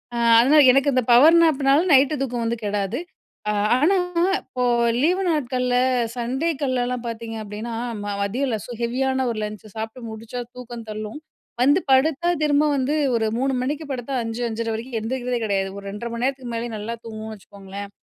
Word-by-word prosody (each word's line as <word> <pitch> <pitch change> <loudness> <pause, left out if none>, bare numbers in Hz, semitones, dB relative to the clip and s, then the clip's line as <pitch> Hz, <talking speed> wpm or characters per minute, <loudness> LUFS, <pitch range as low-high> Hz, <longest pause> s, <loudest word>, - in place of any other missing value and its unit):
அ - - -2 0.2
அதனால 285 +6 +6
எனக்கு 275 +2 +3
இந்த 255 - +3
பவர் 300 +8 +7
நேப்னால, 280 -2 +3
நைட்‌டு 275 +3 +5
தூக்கம் 245 -3 -3
வந்து 235 +1 -1
கெடாது. 205 +3 -1 0.5
அ - - +2 0.3
ஆனா, 355 +8 +3 0.4
இப்போ 250 - -4 0.4
லீவு 360 +6 +2
நாட்கள்ல 250 -5 0 0.4
சண்டேக்கள்லலாம் 255 -1 -1
பாத்தீங்க 230 0 -5
அப்டின்னா, 215 +3 -6 0.3
ம - - -6 0.2
மதியம்ல 230 +4 -1
ஸோ - - -9
ஹெவியான 260 +2 0
ஒரு 225 - -5
லஞ்ச்சு 210 -1 -7
சாப்ட்டு 225 +2 -6
முடிச்சா 225 +3 -6
தூக்கம் 240 -2 -9
தள்ளும். 215 +5 -6 0.4
வந்து 285 +7 +5
படுத்தா 310 +5 +3
திரும்ப 295 0 +3
வந்து 270 +3 0 0.2
ஒரு 225 -1 +1
3:00 270 +1 +1
மணிக்கு 295 +4 -3
படுத்தா, 255 +1 -4
5:00, 225 +1 -4
5:30 225 0 -3
வரைக்கும் 230 +2 -5
எந்திரிக்கிறதே 245 +1 -2
கிடையாது. 195 -2 0
ஒரு 200 - -9
2:30 230 +4 -6
மணி 235 +1 -1
நேரத்துக்கு 260 -3 -3
மேலயே 235 +1 -3
நல்லா 220 +3 -4
தூங்குவோன்னு 220 -1 -7
வச்சுக்கோங்களேன். 200 0 -9
245 Hz, 165 wpm, -23 LUFS, 225-270 Hz, 0.5 s, பவர்